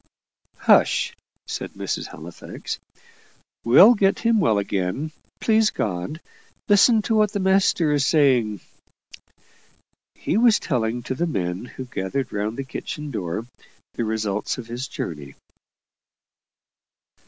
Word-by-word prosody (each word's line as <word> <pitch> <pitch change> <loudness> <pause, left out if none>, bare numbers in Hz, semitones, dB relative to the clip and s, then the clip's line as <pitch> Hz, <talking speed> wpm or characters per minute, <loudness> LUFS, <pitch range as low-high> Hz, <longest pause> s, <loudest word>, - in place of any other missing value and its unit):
"Hush!" - - +3 0.3
said - - -5
Mrs. - - -4
Halifax; 80 +2 -8 0.8
"we'll 185 - +8
get 200 -3 +2
him 230 -1 +2
well 130 - +2
again, 100 +9 -2 0.3
please 220 -1 +3
God. 95 - -3 0.5
Listen 215 +2 +5
to 225 - -1
what 215 -1 +2
the 200 - -1
master's 185 -6 +2
saying." 125 - +2 1.5
He - - -1
was 230 -1 +5
telling 120 -4 -2
to 130 - -3
the 170 +7 -1
men 90 - -3
who 130 +1 -8
gathered 125 +3 -3
round 105 +2 -2
the 135 - -3
kitchen 150 +2 -6
door 100 -1 -4 0.5
the 120 - -2
results 110 -2 -2
of 125 - -7
his 120 +3 -5
journey. 75 - -6
130 Hz, 120 wpm, -23 LUFS, -, 1.5 s, we'll